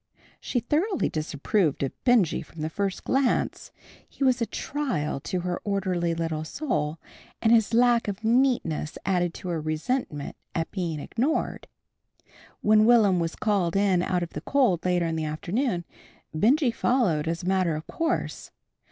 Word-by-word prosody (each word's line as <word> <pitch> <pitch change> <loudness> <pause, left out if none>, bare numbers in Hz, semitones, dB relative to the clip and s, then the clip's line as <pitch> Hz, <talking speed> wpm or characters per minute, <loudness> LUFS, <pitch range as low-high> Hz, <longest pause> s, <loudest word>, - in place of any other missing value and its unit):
She 250 - -1
thoroughly 335 - 0
disapproved 155 +1 0
of 135 - -1
Benjy 230 - +3
from 160 0 -11
the 155 +1 -2
first 200 0 -2
glance. 270 -1 0 0.4
He - - -5
was 255 -2 +3
a 230 - +1
trial 260 - -2
to 180 +5 -3
her 180 0 -3
orderly 185 -4 0
little 165 -2 -2
soul, 155 - -2 0.4
and 225 - +2
his 225 -2 +4
lack 240 0 +4
of 205 +2 -4
neatness 230 - +1
added 175 -2 +1
to 180 - -6
her 165 -2 -1
resentment 155 - -2 0.2
at 165 -1 -2
being 170 -6 -3
ignored. 260 - -1 0.9
When 215 0 +5
Will'm 210 -6 +5
was 165 0 -2
called 195 -5 0
in 195 -3 +3
out 180 -1 0
of 170 - -6
the - - -5
cold 245 - +2
later 180 -1 +2
in 165 -1 -1
the 160 - -2
afternoon, 175 - -2 0.5
Benjy 245 - +3
followed 220 - +1
as 170 +2 -2
a - - -4
matter 185 -4 +2
of 155 - -6
course. 330 0 -2
185 Hz, 160 wpm, -26 LUFS, 165-240 Hz, 0.9 s, When